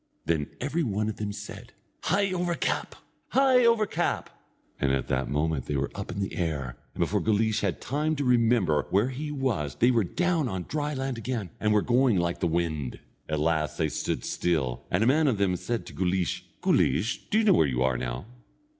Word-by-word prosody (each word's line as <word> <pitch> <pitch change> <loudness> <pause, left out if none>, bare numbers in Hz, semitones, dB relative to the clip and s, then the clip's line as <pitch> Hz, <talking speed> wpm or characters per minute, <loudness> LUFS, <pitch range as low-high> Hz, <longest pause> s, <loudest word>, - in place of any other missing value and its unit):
Then 80 -3 0
every 145 +6 -1
one 110 -5 0
of 110 - -5
them 105 -1 -3
said: - - -9 0.3
"Hie 195 +3 +2
over 175 -1 0
cap! - - -2 0.4
Hie 260 -2 +5
over 230 -2 +4
cap!" - - -1 0.5
and 65 -2 +1
that 65 -1 -1
moment 75 -1 -1
they 75 - -1
were 70 0 -1
up 100 -1 -5
in 95 - -5
the 95 - -3
air, 75 -8 -2 0.2
and - - -3
before - - +1
Guleesh 110 0 +2
had 100 -4 -1
time 150 +4 -1
to 145 -1 -2
remember 115 -11 +3
where 100 +7 +2
he 145 +4 -5
was 115 - -1
they 120 +10 +4
were 115 -3 +3
down 170 - 0
on 95 -3 -3
dry 150 - -2
land 135 -2 -3
again, 115 -6 -3
and 105 - +1
were 105 -1 +3
going 125 -3 +3
like 85 -1 0
the 90 - +1
wind. 80 -6 -2 0.3
At 75 -1 0
last 75 -2 0
they 80 - +1
stood - - -2
still, 75 -8 -1
and 90 +5 +2
a - - +3
man 150 +5 +4
of 125 -6 +2
them 100 -2 +2
said 115 +6 -3
to - - -10
Guleesh: 90 -1 -1 0.2
"Guleesh, 95 - +1
do 215 - +2
you 225 - +4
know 210 - +6
where 80 - +4
you 65 -1 0
are 65 -1 +2
now?" - - -4
100 Hz, 210 wpm, -27 LUFS, -, 0.5 s, know